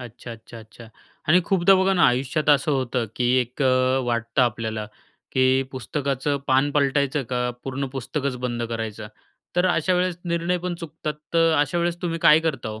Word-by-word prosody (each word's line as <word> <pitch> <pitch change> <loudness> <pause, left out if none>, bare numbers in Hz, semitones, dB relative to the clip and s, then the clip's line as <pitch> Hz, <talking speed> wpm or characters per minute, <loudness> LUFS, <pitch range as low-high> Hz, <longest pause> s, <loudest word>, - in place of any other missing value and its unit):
अच्छा, 120 0 -10
अच्छा, 115 +1 -12
अच्छा 110 +1 -14 0.4
आणि 175 +3 +6
खूपदा 195 0 +4
बघा 190 +1 +3
ना, 175 - +2
आयुष्यात 135 +5 0
असं 145 +1 +3
होतं 130 -3 -1
की 125 - 0 0.2
एक 125 +3 -4
अ, 130 0 +3
वाटतं 115 +1 0
आपल्याला, 110 -2 -2 0.5
की 130 0 +3
"पुस्तकाचं 140 +2 -2
पान 135 +2 +3
पलटायचं 140 0 +1
का 125 0 0
पूर्ण 135 +1 -3
पुस्तकच 135 +1 -3
बंद 120 -1 -2
करायचं?" 110 -2 -5 0.5
तर 180 +1 +3
अशा 180 +1 +1
वेळेस 180 -1 0
निर्णय 170 +1 -1
पण 180 0 -3
चुकतात 155 -1 -5 0.2
तर 165 -1 +4
अशा 145 +4 +1
वेळेस 170 0 0
तुम्ही 165 -1 -2
काय 155 -1 +7
करता 155 -9 -2
हो? 110 0 -7
135 Hz, 175 wpm, -23 LUFS, 125-165 Hz, 0.5 s, काय